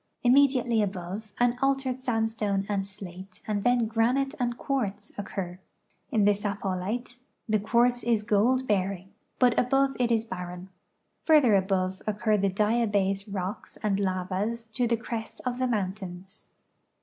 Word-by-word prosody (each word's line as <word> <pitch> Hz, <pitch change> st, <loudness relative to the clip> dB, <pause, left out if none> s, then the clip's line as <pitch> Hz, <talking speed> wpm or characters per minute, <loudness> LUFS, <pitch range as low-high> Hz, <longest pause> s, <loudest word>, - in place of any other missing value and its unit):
Immediately 250 Hz, -3 st, +4 dB
above 195 Hz, +2 st, -4 dB
an 245 Hz, 0 st, +2 dB
altered 270 Hz, -2 st, +1 dB
sandstone 225 Hz, -5 st, 0 dB
and 195 Hz, -2 st, -1 dB
slate 190 Hz, -1 st, -10 dB
and 205 Hz, -2 st, -1 dB
then 245 Hz, -1 st, +3 dB
granite 245 Hz, +5 st, +1 dB
and 240 Hz, -1 st, -1 dB
quartz 225 Hz, -7 st, -2 dB
occur. 185 Hz, -3 st, -5 dB, 0.5 s
In 215 Hz, -5 st, +3 dB
the 205 Hz, -, +6 dB
Sapollite 205 Hz, +4 st, -3 dB, 0.3 s
the 215 Hz, -1 st, +2 dB
quartz 240 Hz, +3 st, +2 dB
is 225 Hz, -3 st, +1 dB
gold 235 Hz, +6 st, +2 dB
bearing, 195 Hz, -2 st, -1 dB, 0.3 s
but 250 Hz, -2 st, +4 dB
above 270 Hz, +2 st, +2 dB
it 240 Hz, -1 st, +2 dB
is 225 Hz, -1 st, +2 dB
barren. 180 Hz, -2 st, -7 dB, 0.6 s
Further 290 Hz, -9 st, +6 dB
above 190 Hz, -1 st, 0 dB
occur 215 Hz, +1 st, +1 dB
the 200 Hz, -1 st, +2 dB
diabase 205 Hz, -1 st, +1 dB
rocks 190 Hz, 0 st, -5 dB
and 200 Hz, -2 st, +1 dB
lavas 195 Hz, +4 st, -1 dB
to 235 Hz, +2 st, 0 dB
the 235 Hz, 0 st, +1 dB
crest 225 Hz, -1 st, -6 dB
of 250 Hz, 0 st, -2 dB
the 255 Hz, -, +1 dB
mountains. 190 Hz, -4 st, -4 dB
215 Hz, 140 wpm, -27 LUFS, 195-240 Hz, 0.6 s, the